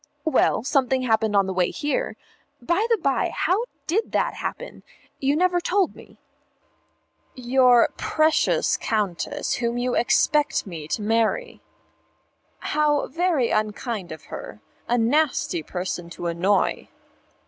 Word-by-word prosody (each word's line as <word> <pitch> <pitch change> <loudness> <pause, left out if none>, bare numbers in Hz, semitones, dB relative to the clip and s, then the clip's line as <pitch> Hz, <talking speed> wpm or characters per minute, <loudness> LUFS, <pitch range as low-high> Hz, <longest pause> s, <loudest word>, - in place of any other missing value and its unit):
"Well, 315 -7 +2
something 260 -1 +1
happened 220 -3 +1
on 200 -1 +4
the 190 - -3
way 180 -1 +1
here. 305 +12 -2 0.4
By 345 - 0
the 460 - +3
by, 275 -7 0
how 405 +7 0 0.2
did 420 +8 -1
that - - +1
happen? - - -6 0.4
You 275 +1 +1
never 355 +2 +2
told 385 +1 +1
me." - - -16 1.2
"Your 250 -1 +4
precious 310 0 +2
Countess, 205 -6 -2
whom 235 0 -1
you 245 0 -1
expect 295 +4 +2
me 165 -6 -7
to 210 - -2
marry." 230 - 0 1.0
"How 295 -1 +1
very 330 -5 +1
unkind 215 -2 -2
of 160 -1 -9
her. - - -8 0.3
A 240 - +1
nasty 250 - +1
person 180 +1 -5
to 175 - -8
annoy." 180 +4 0
245 Hz, 125 wpm, -23 LUFS, 210-310 Hz, 1.2 s, on